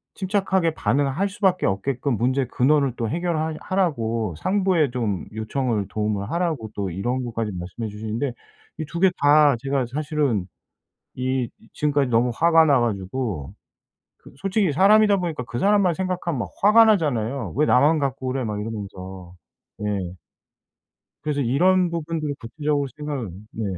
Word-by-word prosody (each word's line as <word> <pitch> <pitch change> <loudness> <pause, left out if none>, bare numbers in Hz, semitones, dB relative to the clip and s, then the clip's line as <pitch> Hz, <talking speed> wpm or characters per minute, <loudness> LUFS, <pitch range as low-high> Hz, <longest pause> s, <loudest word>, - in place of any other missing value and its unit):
침착하게 190 -4 0
반응할 145 +8 +1
수밖에 190 -2 +1
없게끔 125 +6 -1
문제의 130 +2 +1
근원을 140 -1 +2
또 115 -3 -2
해결하 160 -1 -1
하라고 115 - -1
상부에 185 -8 +1
좀 110 -7 -2
요청을 110 -2 -2
도움을 105 0 -2
하라고 165 -11 -2
또 100 -2 -2
이런 120 +8 -2
것까지 115 -2 -3
말씀해 90 +5 -5
주시는데 110 +5 -3 0.5
이 155 - -2
2 170 +3 -6
개 190 - +6
다 145 -1 +5
제가 135 -1 -1
사실은 145 - 0 0.7
이 130 -1 -1 0.3
지금까지 145 -3 +1
너무 120 +2 +3
화가 165 -1 +5
나 140 -5 +4
가지고 100 - -3 0.6
그 - - -17
솔직히 195 -3 0
사람이다 205 +3 +5
보니까 165 -8 -3
그 120 +2 -5
사람만 200 -3 +3
생각하면 180 -6 -2
막 - - -3
화가 220 +3 +7
나잖아요. 135 - +1
'왜 150 +2 +3
나만 150 +5 +4
갖고 135 -1 -2
그래.' 130 0 -2
막 105 -2 -3
이러면서. 95 -4 -7 0.5
예. 105 -1 -1 1.3
그래서 145 -2 -1
이런 175 +8 +3
부분들을 160 -3 -3
구체적으로 145 +3 -2
생각을 140 -9 -4 0.2
네. 110 - -4
140 Hz, 330 characters per minute, -23 LUFS, 115-165 Hz, 1.3 s, 화가